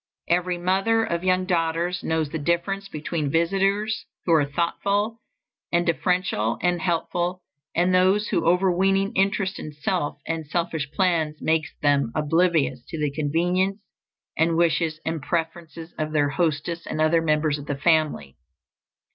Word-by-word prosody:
Every 180 +1 +1
mother 195 +6 +2
of 170 -4 -2
young 185 0 +2
daughters 175 0 0
knows 160 -2 -1
the 160 - -3
difference 175 +5 -1
between 155 -2 -3
visitors 195 +6 +1 0.2
who 170 - +3
are 155 -3 +4
thoughtful 200 +8 -1 0.5
and 175 0 +2
deferential 170 - 0
and 175 -1 +1
helpful, 175 +1 -1 0.3
and 180 +2 +2
those 190 +3 +3
whose 180 -5 +1
overweening 190 +3 +2
interest 195 0 0
in 155 - -6
self 150 0 -2
and 160 -2 -3
selfish 160 -3 -2
plans 165 -4 0
makes 160 -1 0
them 140 -4 +2
oblivious 155 -5 +1
to 165 - -6
the 150 -2 -1
convenience 175 +6 0 0.6
and 165 +1 +2
wishes 165 -2 +1
and 160 -1 -2
preferences 165 +1 -4
of 155 0 -2
their 145 -2 +2
hostess 165 +2 -1
and - - -4
other 155 +1 +3
members 155 -2 +1
of 145 - -10
the 145 - -2
family. 155 - +1
170 Hz, 145 wpm, -24 LUFS, 155-185 Hz, 0.6 s, are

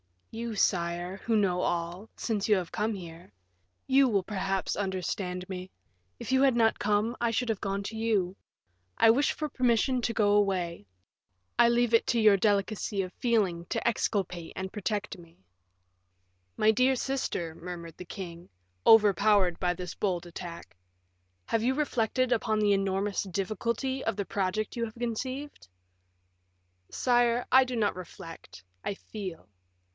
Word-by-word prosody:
"You, 230 0 -4
sire, 175 -1 0
who 225 +2 -1
know 190 -4 +2
all, 175 +5 -2
since 215 -4 -2
you 210 - +5
have 180 -3 -3
come 220 +1 -1
here; 170 - -10 0.5
you 270 0 +5
will, 200 -5 +1
perhaps, 195 -1 -2
understand 185 -1 -3
me. 185 -1 -6 0.5
If - - -5
you 265 0 +4
had 270 -3 +4
not 225 -1 +3
come, 210 +3 +1
I 235 -1 +1
should 240 +1 -1
have 220 -3 0
gone 200 0 -2
to 220 +2 -6
you. 205 -5 0 0.6
I 225 - +7
wish 280 +6 +2
for 305 -1 -4
permission 250 0 +2
to 230 - 0
go 205 -2 +3
away. 185 - +1 0.7
I 240 - +7
leave 235 0 +2
it 230 - +4
to 235 - +2
your 210 -2 +6
delicacy 205 0 0
of 185 -1 -5
feeling 200 -8 +1
to - - -3
exculpate 190 -6 -1
and 190 0 -4
to - - -37
protect 210 -1 -3
me." 165 - -18 1.1
"My 215 - +5
dear 255 +4 +3
sister," 250 -11 -2
murmured 170 -1 -8
the 180 - -8
king, 175 -2 -8 0.4
overpowered 205 -4 +5
by 180 -1 +1
this 180 0 -6
bold 180 -4 -1
attack, 170 - -9 0.7
"have 225 - +1
you 255 +3 +1
reflected 255 -3 0
upon 220 -2 +1
the 210 -1 +3
enormous 195 +1 0
difficulty 215 +7 -2
of 225 - -1
the 200 -1 -3
project 200 +4 -2
you 235 - 0
have 220 - -9
conceived?" 250 - -4 1.2
"Sire, 240 -1 +2
I 260 +1 +7
do 255 -1 -4
not 210 -5 0
reflect, 165 - -10 0.2
I - - -2
feel. 185 - -8
205 Hz, 155 wpm, -29 LUFS, 180-230 Hz, 1.2 s, I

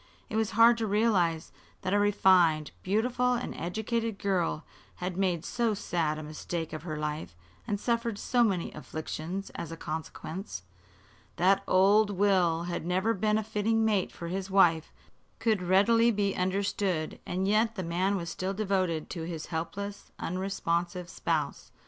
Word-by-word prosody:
It - - -4
was 220 -1 0
hard 230 +1 +7
to 225 - 0
realize 195 -6 +1 0.3
that 185 - -1
a 205 - +4
refined, 185 -6 +4
beautiful 245 +5 +1
and 245 0 -3
educated 220 +4 -2
girl 180 -6 0 0.3
had 180 0 -4
made 180 -3 0
so 235 -3 0
sad 165 -5 -1
a 155 - -6
mistake 155 +2 -5
of 155 - -5
her 155 -2 -5
life 150 - -4 0.3
and 205 - -1
suffered 235 -1 -1
so 245 +3 +2
many 190 -6 0
afflictions 155 +5 -5
as 165 - -6
a 165 - -6
consequence. 160 - -6 0.7
That 190 +3 +4
old 200 +3 +5
Will 185 -4 +2
had 175 -2 -3
never 185 +6 +1
been 215 +1 +1
a 220 - -1
fitting 220 +1 +1
mate 205 -4 +1
for 170 - -7
his 190 +2 -3
wife 170 -5 +4 0.5
could 220 -4 +1
readily 205 +6 +4
be 205 -3 0
understood, 185 -3 -1
and 185 +2 -1
yet 220 +2 +2
the 190 - -3
man 180 +4 0
was 170 -3 -3
still 190 +1 -3
devoted 185 -6 0
to 165 -3 -4
his 165 -2 -5
helpless, 200 +5 -5
unresponsive 175 -1 -2
spouse. 155 -6 -2
190 Hz, 155 wpm, -29 LUFS, 170-210 Hz, 0.7 s, hard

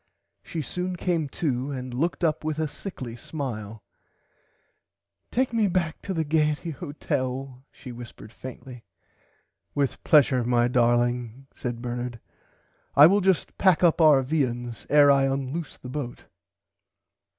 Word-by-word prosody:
She 160 -2 -5
soon 180 +6 -3
came 170 -4 -1
to 135 -3 -2
and 130 -2 -5
looked 165 +8 -1
up 160 -2 +1
with 155 -1 -2
a 160 -1 0
sickly 135 - -7
smile 115 -7 -6 1.5
Take 255 0 0
me 220 -3 +3
back 170 -4 -1
to 195 - -5
the 165 -4 -1
Gaierty 150 +2 +1
hotel 135 -4 -4
she 125 - -10
whispered 120 -2 -11
faintly. 125 -1 -10 0.9
With 140 -2 -1
plesure 135 -5 +5
my 120 0 +2
darling 120 +1 +1
said 120 -1 -5
Bernard 120 -1 -4 0.8
I 145 - +10
will 200 +5 +5
just 190 -2 +1
pack 185 -3 +4
up 170 -1 +4
our 150 -4 +6
viands 120 -5 -2
ere 145 -1 +7
I 135 -1 +4
unloose 135 +3 -3
the - - -10
boat. 130 -3 -5
135 Hz, 135 wpm, -26 LUFS, 125-160 Hz, 1.5 s, I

